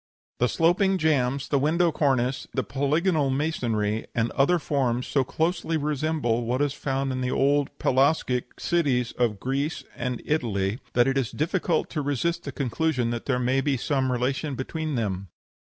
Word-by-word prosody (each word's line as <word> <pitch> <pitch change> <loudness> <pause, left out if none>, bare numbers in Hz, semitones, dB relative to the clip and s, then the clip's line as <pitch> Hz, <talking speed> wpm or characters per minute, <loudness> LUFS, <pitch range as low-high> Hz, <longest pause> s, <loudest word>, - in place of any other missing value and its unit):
"The 125 - +3
sloping 190 +4 +3
jambs, 140 -5 +1
the 140 - +2
window 165 +4 +2
cornice, 130 -4 0
the 130 - +1
polygonal 150 +2 +1
masonry, 115 -7 -1
and 115 0 +1
other 145 +6 +3
forms 130 -6 0
so 135 - +1
closely 165 +3 -1
resemble 150 -5 0
what 125 +3 0
is 145 -1 +1
found 135 -1 -2
in 130 0 -2
the 125 - -1
old 140 +2 +2
Pelasgic 130 -2 +1
cities 135 -9 +1
of 115 -5 0
Greece 140 +6 -2
and 125 -1 -3
Italy, 110 -7 0
that 120 +1 +4
it 135 0 +2
is 125 -3 -1
difficult 165 +1 0
to 155 - -2
resist 165 +5 -1
the 140 - -4
conclusion 130 -1 0
that 120 -1 -4
there 135 -3 +2
may 125 +2 +1
be 135 -1 0
some 130 0 0
relation 130 +4 -1
between 155 +3 -3
them." 100 -5 -2
135 Hz, 165 wpm, -26 LUFS, 125-155 Hz, -, that